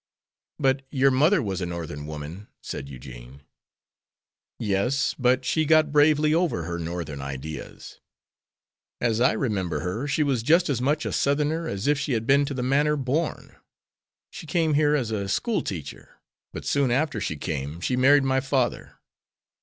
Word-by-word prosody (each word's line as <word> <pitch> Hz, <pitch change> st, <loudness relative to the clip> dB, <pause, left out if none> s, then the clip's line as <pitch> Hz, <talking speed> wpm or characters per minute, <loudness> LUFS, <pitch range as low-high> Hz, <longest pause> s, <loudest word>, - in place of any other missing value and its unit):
"But 135 Hz, -1 st, +1 dB
your 135 Hz, 0 st, +3 dB
mother 155 Hz, +6 st, +3 dB
was 95 Hz, -3 st, -3 dB
a 90 Hz, -, -2 dB
Northern 80 Hz, -4 st, -6 dB
woman," 80 Hz, +6 st, -7 dB, 0.2 s
said 70 Hz, -, -6 dB
Eugene. 65 Hz, 0 st, -11 dB, 1.1 s
"Yes; 115 Hz, +6 st, 0 dB
but 130 Hz, 0 st, +2 dB
she 160 Hz, -, +1 dB
got 155 Hz, -1 st, +4 dB
bravely 150 Hz, +1 st, +4 dB
over 165 Hz, -, +1 dB
her 85 Hz, +1 st, -4 dB
Northern 85 Hz, -4 st, -5 dB
ideas. 70 Hz, +3 st, -8 dB, 1.0 s
As 115 Hz, -1 st, 0 dB
I 125 Hz, -, +4 dB
remember 95 Hz, -, -1 dB
her, 95 Hz, -, -3 dB
she 150 Hz, +1 st, +1 dB
was 135 Hz, -5 st, 0 dB
just 160 Hz, +6 st, +3 dB
as 125 Hz, -3 st, -1 dB
much 150 Hz, +4 st, 0 dB
a -, -, -2 dB
Southerner 150 Hz, +4 st, 0 dB
as 100 Hz, -4 st, -4 dB
if 145 Hz, 0 st, +2 dB
she 140 Hz, -1 st, -2 dB
had 115 Hz, -1 st, -1 dB
been 140 Hz, +2 st, +4 dB
to 140 Hz, -, -4 dB
the 125 Hz, -, -2 dB
manor 145 Hz, +4 st, +2 dB
born. 145 Hz, +5 st, -2 dB, 0.7 s
She 160 Hz, -, -9 dB
came 160 Hz, 0 st, +1 dB
here 150 Hz, 0 st, +3 dB
as 120 Hz, -6 st, -1 dB
a 100 Hz, -3 st, -2 dB
school 230 Hz, -, 0 dB
teacher, 75 Hz, -7 st, -7 dB, 0.3 s
but -, -, -8 dB
soon 140 Hz, -2 st, +1 dB
after 130 Hz, -3 st, 0 dB
she 75 Hz, -, -3 dB
came 75 Hz, 0 st, -4 dB
she 125 Hz, +8 st, -1 dB
married 140 Hz, +3 st, +5 dB
my 130 Hz, 0 st, +2 dB
father. 130 Hz, -2 st, -1 dB
130 Hz, 165 wpm, -25 LUFS, 85-145 Hz, 1.1 s, married